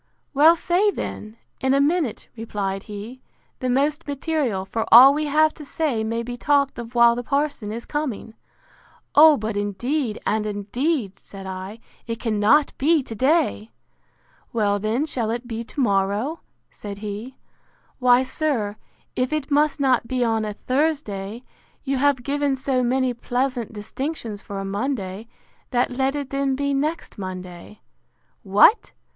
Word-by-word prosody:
—Well, 310 +4 +6
say 355 +5 +2
then, 215 - -6 0.2
in 265 0 +2
a - - +3
minute, 290 -4 0
replied 200 -4 -3
he, 215 +5 -8 0.4
the 255 - -2
most 285 +5 0
material: 280 - -1
for 225 +3 -2
all 260 +4 +10
we 300 +1 -1
have 310 +2 +3
to 300 - -11
say 280 -6 -1
may 230 +1 -2
be 245 +1 -6
talked 280 0 +1
of 235 +1 -8
while 235 0 +6
the 240 - -3
parson 280 -5 -1
is 230 +2 -6
coming.—O, 295 +3 0
but 215 0 -3
indeed, 220 +5 -2
and 215 0 0
indeed, 210 - -2
said 195 -1 -11
I, 190 +3 -7 0.3
it 230 -1 -4
cannot 225 +6 +2
be 305 +1 +3
to 230 - -7
day!—Well, 225 -5 -2
then, 220 +8 0
shall 240 -7 -2
it 240 +2 -3
be 230 -1 -4
to 285 - -9
morrow? 205 +6 +1 0.3
said 200 -1 -8
he.—Why, 245 +3 -2
sir, 255 -8 -2 0.4
if 255 +2 0
it 305 -1 -2
must 295 +1 +2
not 255 -4 +2
be 255 0 0
on 225 -2 0
a 210 -1 -5
Thursday, 250 -6 -2 0.4
you 275 -1 -1
have 275 -2 +2
given 285 0 0
so 265 -1 0
many 255 +1 +1
pleasant 245 0 -2
distinctions 220 0 -5
for 200 - -7
a 195 - -4
Monday, 200 -1 -3 0.4
that 245 0 +1
let 265 +2 0
it 285 -2 -4
then 275 -1 0
be 280 +1 -1
next 300 -3 -2
Monday.—What! 185 - -1
245 Hz, 145 wpm, -23 LUFS, 215-285 Hz, 0.4 s, all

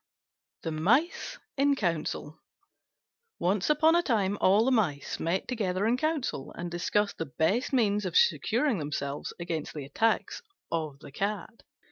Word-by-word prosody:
THE 165 - -2
MICE 245 - +1 0.2
IN 280 +1 +4
COUNCIL 160 - -2 1.0
Once 190 +5 +1
upon 310 +2 +5
a 345 - +5
time 205 - +1
all 205 +4 +5
the 265 - +3
Mice 180 - 0
met 175 +3 -1
together 200 -5 -1
in 230 +2 +3
Council, 265 - -2
and 175 0 -5
discussed 200 +4 0
the 165 - -2
best 200 +10 +1
means 210 -5 +2
of 175 - +1
securing 220 - +2
themselves 145 -1 -3
against 165 -3 -4
the 145 -3 -5
attacks 225 - 0 0.3
of 155 -4 -2
the 145 - -11
cat. 205 +5 -3
195 Hz, 145 wpm, -29 LUFS, 160-235 Hz, 1.0 s, upon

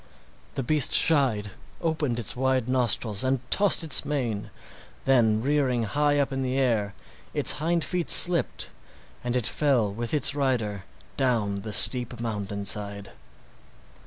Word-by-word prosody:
The 135 - -4
beast 150 +3 +1
shied, 125 -10 +2 0.3
opened 155 -7 -3
its 115 -3 -3
wide 130 -1 -1
nostrils, 120 -4 0
and 130 0 -1
tossed 200 -4 +3
its 155 -5 +5
mane, 120 -8 -4 0.5
then 115 -5 +1
rearing 135 -4 -1
high 145 +7 -1
up 140 -1 -1
in 135 - -4
the 130 0 -3
air, 110 -6 -1 0.4
its - - +7
hind 170 +1 -1
feet 180 -2 -4
slipped 175 -2 +5 0.5
and 125 0 -3
it 125 -3 -1
fell 125 -9 -1
with 115 +2 -5
its 150 -2 +1
rider 120 -8 -3 0.3
down 110 -7 -2
the 110 +1 -8
steep 120 +2 +3
mountain 105 -3 -6
side. 100 0 -4
125 Hz, 140 wpm, -24 LUFS, 110-140 Hz, 0.5 s, its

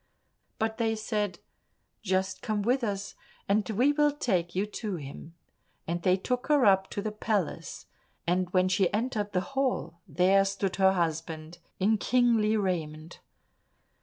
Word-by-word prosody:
But 220 +1 -2
they 225 -1 +1
said, 210 -4 -2 0.6
"Just 190 -1 -1
come 210 -2 -1
with 250 +4 +1
us, 200 -3 -3 0.3
and 205 +2 +1
we 245 +7 +3
will 295 0 +3
take 185 - -1
you 195 +3 +1
to 210 -1 -4
him," 155 +2 -9 0.5
and 170 +1 -2
they 185 0 +3
took 250 +6 -2
her 295 -4 +4
up 190 -1 +4
to 200 - -4
the 215 - -2
palace, 210 -4 -2 0.4
and 180 +1 +1
when 185 0 +3
she 185 -1 +2
entered 210 -1 -1
the 180 - +2
hall, 250 - -1
there 185 +5 +4
stood 195 -1 -2
her 190 -1 +5
husband 165 -1 -3 0.2
in 210 +3 +2
kingly 230 -3 +3
raiment. 165 -5 -3
195 Hz, 150 wpm, -28 LUFS, 180-220 Hz, 0.6 s, her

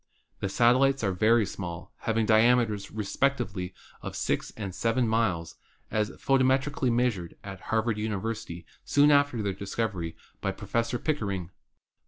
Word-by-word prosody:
The 100 - -2
satellites 130 +4 +4
are 100 - +2
very 110 +4 +3
small, 90 -3 -7
having 115 -1 +2
diame 120 +3 +5
ters 105 -2 -5
respectively 100 -4 -1 0.3
of - - -6
six - - -1
and 100 -4 -4
seven 115 +4 +1
miles, 95 -8 0 0.3
as 105 -1 +1
photometrically 135 0 +1
measured 115 -8 0
at 100 -1 -8
Harvard 110 -1 +1
University 105 -4 -4 0.2
soon 145 +1 +4
after 145 -6 +3
their 100 -1 -1
discovery 95 -4 -3 0.3
by - - -1
Professor 115 +1 -1
Pickering. 100 - -2
110 Hz, 135 wpm, -28 LUFS, 100-120 Hz, 0.3 s, diame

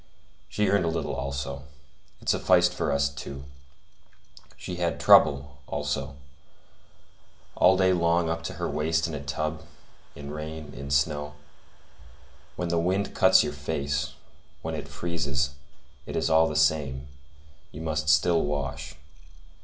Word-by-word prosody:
She 105 -1 0
earned 100 -1 +3
a - - 0
little 80 -2 -2
also. 70 0 -4 0.6
It - - -15
sufficed - - +4
for - - -1
us 70 0 +2
two. 70 -1 -7 1.1
She 90 - -6
had 85 -1 -1
trouble, 70 0 +5
also; 70 -1 -3 1.4
all 95 +1 +5
day 95 -1 +4
long 85 -1 +2
up 85 0 -2
to - - -4
her - - -3
waist 80 +2 0
in 80 - -4
a 70 -1 -5
tub, 75 +2 -3 0.5
in 70 +1 -8
rain, 75 -1 -7
in 70 +2 -8
snow. 75 +1 0 1.2
When 90 -1 -3
the 85 0 +1
wind 95 +4 0
cuts 95 -1 +6
your 75 -1 -3
face, 70 -1 -2 0.5
when - - -3
it - - -5
freezes, 70 -6 -2 0.6
it - - -5
is - - 0
all 80 0 +5
the 75 - -4
same; 75 -3 +1 0.6
you 75 - -8
must 75 -1 -1
still 80 +2 +4
wash. 70 -3 -3
75 Hz, 140 wpm, -27 LUFS, 70-85 Hz, 1.4 s, cuts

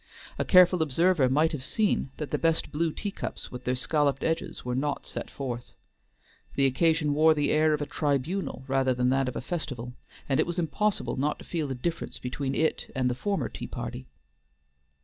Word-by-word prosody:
A - - +1
careful 180 -2 +6
observer 160 -1 +3
might 155 +5 +3
have 145 -5 -4
seen 205 -1 +1
that 150 - -5
the - - 0
best 165 -1 +1
blue 160 +2 0
teacups 205 +5 -5
with 125 0 -8
their 125 - +1
scalloped 140 +1 +1
edges 165 -5 -2
were 125 - -1
not 140 +3 -1
set - - -6
forth. 125 -3 -5 0.8
The 140 - +3
occasion 150 +2 +2
wore 155 +2 +5
the 145 -1 +1
air 155 0 +4
of 150 - -3
a - - -3
tribunal 145 +4 -1
rather 135 -1 +2
than 125 0 +2
that 135 0 +2
of - - -8
a - - -2
festival, 130 -6 -4 0.3
and 135 - +1
it - - +3
was 175 +1 -3
impossible 175 - 0
not 145 +3 0
to - - -12
feel 160 -5 -2
a 130 - -2
difference 165 +7 -3
between 135 +2 -3
it 160 0 0
and 125 -1 +1
the - - 0
former 195 +11 -1
tea - - -7
party. 65 - -6
145 Hz, 195 wpm, -28 LUFS, 130-165 Hz, 0.8 s, careful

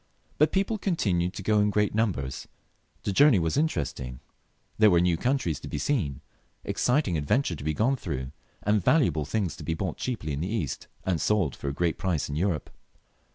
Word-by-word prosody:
But 150 - +5
people 200 +3 0
continued 95 - 0
to 100 - -6
go 105 +2 +3
in 105 0 +3
great 105 0 +1
numbers; 70 - -1 0.6
the - - -1
journey 140 +3 +6
was 80 -2 0
interesting, 70 - -1 0.6
there 110 -1 +7
were 85 -3 +5
new 90 -1 +3
countries 120 - 0
to - - -9
be - - -4
seen, 80 - -1 0.4
exciting 125 - +1
adventures 95 - +1
to - - -8
be 75 0 -1
gone 130 - +2
through, 65 - -4 0.3
and 105 -2 +2
valuable 85 - +3
things 95 -1 -1
to - - -8
be 80 - -1
bought 90 -1 -3
cheaply 105 - -3
in 70 - -3
the 90 - -2
East, 90 - -3 0.2
and 90 -5 0
sold 100 -10 +1
for - - -7
a - - -3
great 85 +2 0
price 90 -7 -1
in 70 - -3
Europe. 85 -1 -1
95 Hz, 195 wpm, -27 LUFS, 80-115 Hz, 0.6 s, there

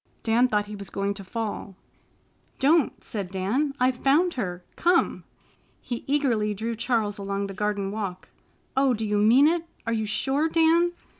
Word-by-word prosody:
Dan 235 +2 +3
thought 210 -3 0
he 210 0 -8
was 200 -1 -7
going 200 0 -1
to 200 0 -9
fall. 205 -1 -5 0.8
"Don't!" 295 +2 +2
said 200 -5 -5
Dan. 225 +10 -1
"I've 255 +1 +3
found 315 +8 +3
her. 180 -7 -4
Come!" 350 0 +2 0.5
He 240 -2 -5
eagerly 240 -8 +1
drew 225 +3 -3
Charles 225 -3 -1
along 200 0 -2
the 195 - -6
garden 200 -1 -2
walk. 200 -4 -5 0.5
"Oh, 265 -2 +3
do 220 0 -3
you 210 -1 +1
mean 240 +8 +6
it? 335 +1 0 0.2
Are 230 - 0
you 220 -1 -1
sure, 275 +9 +1
Dan?" 335 +2 +3
225 Hz, 165 wpm, -25 LUFS, 200-275 Hz, 0.8 s, mean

